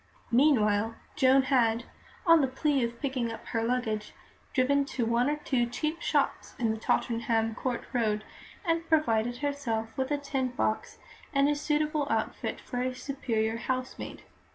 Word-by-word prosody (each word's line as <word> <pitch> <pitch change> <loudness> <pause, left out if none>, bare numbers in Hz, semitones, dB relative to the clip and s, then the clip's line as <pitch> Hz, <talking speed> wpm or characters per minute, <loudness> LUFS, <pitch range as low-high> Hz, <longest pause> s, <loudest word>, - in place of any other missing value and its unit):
Meanwhile, 225 -5 +3 0.2
Joan 270 -2 +5
had, 235 -4 +2 0.4
on 330 -2 +7
the 270 - +2
plea 270 0 +1
of 235 0 -3
picking 260 -4 -1
up 225 - -8
her 225 - 0
luggage, 225 -3 -1 0.4
driven 280 +2 +3
to 250 -3 -2
one 235 +4 +2
or 295 - +1
two 260 -5 0
cheap 305 +7 -3
shops - - 0
in 230 -2 +1
the 220 - -2
Tottenham 225 0 +1
Court 245 +1 -2
Road, 215 -3 +1 0.4
and 330 -1 0
provided 240 -7 +2
herself 250 -6 -2
with 265 0 -1
a 290 - +1
tin 275 -2 -1
box 240 -3 -2 0.4
and 275 0 +4
a 295 - +3
suitable 300 0 0
outfit - - -1
for 245 -1 -4
a 255 0 -1
superior 230 -5 -1
housemaid. 255 +2 -4
255 Hz, 155 wpm, -29 LUFS, 230-285 Hz, 0.4 s, on